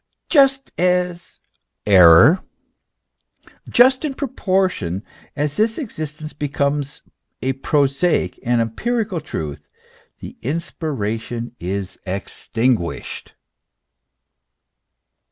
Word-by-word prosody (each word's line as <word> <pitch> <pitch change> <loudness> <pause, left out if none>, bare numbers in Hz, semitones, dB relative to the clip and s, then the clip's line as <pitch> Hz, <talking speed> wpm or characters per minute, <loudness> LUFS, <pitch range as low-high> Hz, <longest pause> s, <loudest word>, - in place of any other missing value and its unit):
Just 275 -2 +4
in 180 -1 +1 2.9
proportion 185 - -1 0.3
as 150 -1 -2
this 220 +1 +1
existence 155 - -6
becomes 145 0 -2 0.4
a 135 +1 +1
prosaic, 140 - +1
an 120 0 +1
empirical 205 - -2
truth, 75 - -6 0.5
the - - -10
inspiration 120 -6 -4
is 95 +1 -4
extinguished. 105 +1 -2
145 Hz, 65 wpm, -20 LUFS, 115-180 Hz, 2.9 s, Just